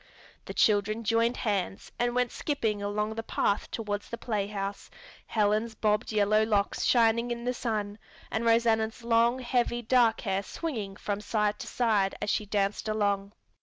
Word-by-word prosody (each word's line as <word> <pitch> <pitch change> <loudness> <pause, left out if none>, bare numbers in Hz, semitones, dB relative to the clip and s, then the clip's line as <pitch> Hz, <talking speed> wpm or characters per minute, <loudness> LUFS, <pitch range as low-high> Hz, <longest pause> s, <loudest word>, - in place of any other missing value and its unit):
The - - -7
children 215 +1 +2
joined 230 +2 +2
hands 195 -4 -2
and 245 0 +1
went 250 -1 +1
skipping 220 -8 -1
along 210 +1 -1
the 225 - -4
path 205 -2 0
toward 210 -2 -3
the 235 - -7
playhouse, 200 -3 -3 0.4
Helen's 215 +1 +1
bobbed 210 +2 0
yellow 215 0 +3
locks 210 -2 0
shining 235 0 +3
in 235 0 -4
the 250 - 0
sun 215 -3 -3 0.3
and 220 - -1
Rosanna's 230 0 +2
long, 235 +1 +3
heavy, 240 -1 0
dark 235 -1 +3
hair 195 -2 -1
swinging 210 - -5
from 205 0 -3
side 210 0 0
to - - -6
side 210 -5 +1
as - - -1
she 210 - -1
danced 200 +1 -1
along. 200 -1 0
215 Hz, 160 wpm, -28 LUFS, 205-235 Hz, 0.4 s, yellow